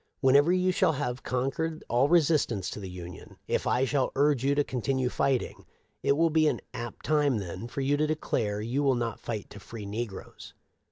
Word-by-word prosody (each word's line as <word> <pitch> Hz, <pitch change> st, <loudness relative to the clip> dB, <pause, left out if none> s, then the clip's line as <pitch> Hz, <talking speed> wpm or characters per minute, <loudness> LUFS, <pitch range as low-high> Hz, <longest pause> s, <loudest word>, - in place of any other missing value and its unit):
Whenever 140 Hz, +4 st, +5 dB
you 185 Hz, 0 st, +2 dB
shall 165 Hz, -, +2 dB
have 125 Hz, -2 st, -3 dB
con 130 Hz, +1 st, -1 dB
quered 160 Hz, +2 st, -3 dB
all 125 Hz, +5 st, +2 dB
resistance 150 Hz, -, +2 dB
to -, -, -6 dB
the 95 Hz, -2 st, -7 dB
Union, 90 Hz, -1 st, -10 dB
if -, -, 0 dB
I 130 Hz, +2 st, +2 dB
shall 135 Hz, -1 st, 0 dB
urge 140 Hz, -2 st, +2 dB
you 140 Hz, +1 st, +2 dB
to 145 Hz, -, +3 dB
continue 130 Hz, 0 st, -1 dB
fighting, 135 Hz, -1 st, -1 dB, 0.4 s
it -, -, +3 dB
will 165 Hz, 0 st, +3 dB
be 155 Hz, 0 st, +4 dB
an -, -, 0 dB
apt 120 Hz, -2 st, -7 dB
time 145 Hz, -5 st, +2 dB
then 95 Hz, +2 st, -5 dB
for 135 Hz, -, -4 dB
you 140 Hz, +2 st, +2 dB
to 155 Hz, +1 st, +1 dB
declare 110 Hz, -9 st, -1 dB
you 120 Hz, +6 st, -1 dB
will 135 Hz, -2 st, +3 dB
not 120 Hz, -2 st, -2 dB
fight 110 Hz, -3 st, -5 dB
to 105 Hz, -, -10 dB
free 105 Hz, +2 st, -9 dB
negroes. 105 Hz, 0 st, -6 dB
130 Hz, 205 wpm, -28 LUFS, 115-145 Hz, 0.4 s, Whenever